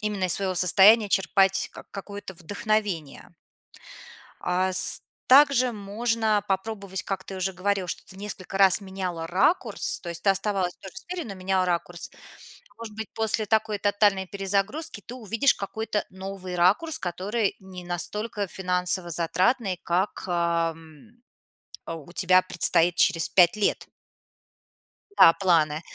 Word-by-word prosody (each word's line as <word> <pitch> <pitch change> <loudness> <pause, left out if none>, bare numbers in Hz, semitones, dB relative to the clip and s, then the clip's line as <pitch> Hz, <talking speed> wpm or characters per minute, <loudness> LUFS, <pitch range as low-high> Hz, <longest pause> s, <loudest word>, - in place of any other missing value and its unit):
именно 210 -3 -2
из 180 - +2
своего 190 -2 -2
состояния 200 +5 +5
черпать 195 0 +2
ка - - -11
какое-то 200 -1 -8
вдохновение. 190 -4 -3 1.1
А 185 +1 0
с - - +2 0.3
также 265 -2 +6
можно 215 +1 -1
попробовать, 195 -1 -3
как 195 - -4
ты 195 - -8
уже 190 +1 -2
говорила, 190 0 -1
что - - -5
ты 190 - -16
несколько 195 -1 -6
раз 195 0 +5
меняла 185 -4 -5
ракурс. 190 - +1
То 175 - -8
есть 170 0 -6
ты 200 - +3
оставалась 195 -2 -1
тоже 190 - -12
в - - -11
сфере, 360 -1 -6
но 200 -7 -8
меняла 185 0 0
ракурс. 175 0 -3 0.7
Может 225 -2 -9
быть, 220 -1 -6
после 220 -1 0
такой 220 -1 0
тотальной 205 -1 +2
перезагрузки 205 - -2
ты 245 - -9
увидишь 230 +3 +1
какой-то 210 +1 -3
новый 190 -1 -7
ракурс, 200 - +2
который 195 +5 -2
не 190 -2 -11
настолько 205 +4 -3
финансово 180 -1 -1
затратный, 185 +4 0
как, 180 +4 -1
ам, 165 -1 -2 0.8
у 165 0 -8
тебя 185 0 +4
предстоит 175 -1 +2
через 170 -2 +3
5 175 -2 +5
лет. 215 -1 -1 1.3
Да, 165 - +8
планы. 160 -5 +2
190 Hz, 135 wpm, -25 LUFS, 180-210 Hz, 1.3 s, Да